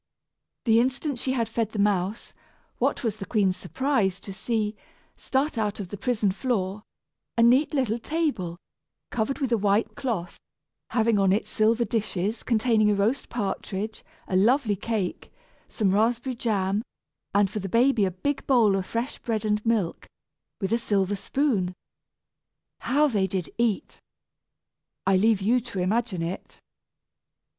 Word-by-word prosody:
The 225 Hz, -1 st, +5 dB
instant 260 Hz, +2 st, 0 dB
she 260 Hz, +1 st, 0 dB
had 230 Hz, -3 st, 0 dB
fed 225 Hz, -1 st, -2 dB
the -, -, -4 dB
mouse, 200 Hz, +1 st, 0 dB, 0.5 s
what -, -, 0 dB
was 220 Hz, -3 st, -1 dB
the 195 Hz, -, -6 dB
queen's 195 Hz, -5 st, +2 dB
surprise 200 Hz, -3 st, 0 dB
to 195 Hz, -, -8 dB
see, 215 Hz, +1 st, -1 dB, 0.4 s
start 270 Hz, -2 st, -1 dB
out 210 Hz, -1 st, -1 dB
of 190 Hz, -3 st, -5 dB
the 205 Hz, -, -5 dB
prison 215 Hz, -3 st, +1 dB
floor, 205 Hz, -3 st, -1 dB, 0.6 s
a 230 Hz, -, +5 dB
neat 255 Hz, +6 st, +5 dB
little 255 Hz, -6 st, 0 dB
table, 250 Hz, -, -1 dB, 0.5 s
covered 240 Hz, +4 st, -1 dB
with 270 Hz, -4 st, -2 dB
a 230 Hz, -, +3 dB
white 205 Hz, +2 st, +2 dB
cloth, 205 Hz, -10 st, -3 dB, 0.5 s
having 225 Hz, -2 st, +2 dB
on 195 Hz, -1 st, +4 dB
it 205 Hz, +3 st, +1 dB
silver 225 Hz, +2 st, +2 dB
dishes, 215 Hz, -1 st, -1 dB
containing 220 Hz, -2 st, +3 dB
a 205 Hz, -, +3 dB
roast 220 Hz, +7 st, 0 dB
partridge, 205 Hz, -1 st, -3 dB, 0.2 s
a 185 Hz, -, -2 dB
lovely 220 Hz, +2 st, +3 dB
cake, 205 Hz, -2 st, -3 dB, 0.4 s
some 200 Hz, -4 st, +1 dB
raspberry 235 Hz, +5 st, +1 dB
jam, 205 Hz, -3 st, 0 dB, 0.5 s
and 200 Hz, -1 st, +4 dB
for 215 Hz, -, -3 dB
the 195 Hz, -1 st, -5 dB
baby 235 Hz, +1 st, +3 dB
a 190 Hz, -, +3 dB
big 270 Hz, +11 st, -3 dB
bowl 230 Hz, -7 st, +5 dB
of 190 Hz, -1 st, -2 dB
fresh 235 Hz, +4 st, -3 dB
bread 220 Hz, -2 st, -2 dB
and 210 Hz, 0 st, +1 dB
milk, 220 Hz, -7 st, 0 dB, 0.5 s
with 195 Hz, -1 st, -2 dB
a 230 Hz, -, +2 dB
silver 205 Hz, -3 st, +1 dB
spoon! 200 Hz, -5 st, 0 dB, 1.0 s
How 295 Hz, +3 st, +3 dB
they 205 Hz, -8 st, +1 dB
did 185 Hz, -2 st, -3 dB
eat! 235 Hz, -, -1 dB, 1.0 s
I 195 Hz, -, +4 dB
leave 205 Hz, +1 st, +3 dB
you 240 Hz, +5 st, +4 dB
to 235 Hz, -4 st, -8 dB
imagine 195 Hz, -1 st, 0 dB
it! 170 Hz, +3 st, -6 dB
215 Hz, 150 wpm, -26 LUFS, 195-240 Hz, 1.0 s, The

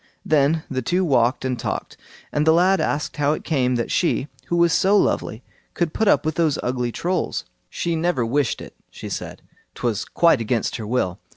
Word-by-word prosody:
Then 155 Hz, +1 st, +2 dB
the 130 Hz, -1 st, -2 dB
two 180 Hz, +4 st, 0 dB
talked 125 Hz, -2 st, +2 dB
and 125 Hz, -2 st, -2 dB
talked, -, -, -4 dB, 0.4 s
and 150 Hz, +1 st, 0 dB
the 160 Hz, -, +7 dB
lad 185 Hz, +3 st, +4 dB
asked 150 Hz, +1 st, -2 dB
how 145 Hz, 0 st, +2 dB
it -, -, -5 dB
came 130 Hz, -5 st, +1 dB
that 120 Hz, -, -2 dB
she, 165 Hz, -5 st, +1 dB, 0.2 s
who 175 Hz, -, 0 dB
was 170 Hz, -1 st, +4 dB
so 200 Hz, +2 st, +4 dB
lovely, 115 Hz, -, 0 dB, 0.3 s
could 170 Hz, -3 st, -1 dB
put 220 Hz, -, 0 dB
up 195 Hz, -, +4 dB
with 155 Hz, -, 0 dB
those 160 Hz, -3 st, +1 dB
ugly 125 Hz, -1 st, -1 dB
Trolls. 175 Hz, +6 st, -2 dB, 0.2 s
She 170 Hz, -1 st, -2 dB
never 160 Hz, -7 st, 0 dB
wished 135 Hz, +1 st, 0 dB
it, -, -, -11 dB
she -, -, -9 dB
said; -, -, -6 dB, 0.3 s
'twas 115 Hz, -3 st, -2 dB
quite 165 Hz, -8 st, +3 dB
against 115 Hz, 0 st, -1 dB
her 110 Hz, -3 st, -6 dB
will. 105 Hz, -7 st, -1 dB
145 Hz, 195 wpm, -22 LUFS, 125-170 Hz, 0.4 s, the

